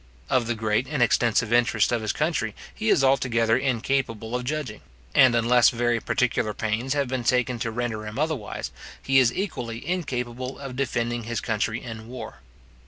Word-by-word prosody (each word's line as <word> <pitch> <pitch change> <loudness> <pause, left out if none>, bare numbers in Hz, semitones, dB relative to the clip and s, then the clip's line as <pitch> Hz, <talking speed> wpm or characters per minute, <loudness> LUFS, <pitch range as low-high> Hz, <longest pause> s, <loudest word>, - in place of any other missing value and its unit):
Of 125 -3 +2
the 120 - 0
great 110 +3 0
and 145 -3 +1
extensive 115 -1 +2
interests 120 -2 +3
of 120 -2 0
his 110 - -1
country 150 -9 -1 0.2
he 110 - -2
is 135 - +4
altogether 120 -4 +3
incapable 125 -3 -1
of 125 0 -2
judging; 135 -6 -3 0.3
and 130 -2 +6
unless 120 0 +5
very 120 -1 0
particular 115 -3 0
pains 115 +5 -1
have 140 -2 +1
been 130 -1 -2
taken 125 0 +1
to 115 - -2
render 110 -2 -3
him 105 - -7
otherwise, 150 -7 -2 0.3
he 135 0 +4
is 125 -3 +4
equally 120 - -4
incapable 130 -7 -3
of 135 -3 -7
defending 120 -3 -1
his 115 -1 -2
country 110 0 -2
in 115 -2 -8
war. 125 +1 -8
120 Hz, 170 wpm, -25 LUFS, 115-130 Hz, 0.3 s, and